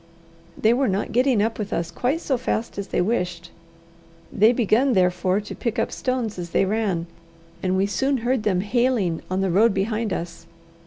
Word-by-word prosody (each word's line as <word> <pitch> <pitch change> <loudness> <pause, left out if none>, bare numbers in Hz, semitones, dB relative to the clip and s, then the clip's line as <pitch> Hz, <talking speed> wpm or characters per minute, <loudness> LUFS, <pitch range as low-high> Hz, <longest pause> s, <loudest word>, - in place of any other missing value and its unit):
They 220 +2 +4
were 265 +2 +1
not 195 0 -1
getting 250 -3 +3
up 225 +1 -2
with 210 0 -4
us 170 0 -2
quite 265 - -1
so 275 - 0
fast 230 -3 -3
as 200 - -4
they - - 0
wished; 180 -4 -2 0.8
they 215 +3 +5
began 245 +2 +2
therefore 185 0 +2
to 205 - -8
pick 235 0 -3
up 225 - 0
stones 245 -6 -2
as 170 -1 -5
they 195 - +2
ran, 195 -4 -1 0.6
and 185 0 0
we 195 - +2
soon 265 +7 0
heard 255 -1 +1
them 195 -4 +1
hailing 210 -5 0
on 185 +1 -1
the 190 -2 0
road 210 +4 +4
behind 215 +2 -1
us. 170 0 -5
210 Hz, 190 wpm, -23 LUFS, 185-240 Hz, 0.8 s, they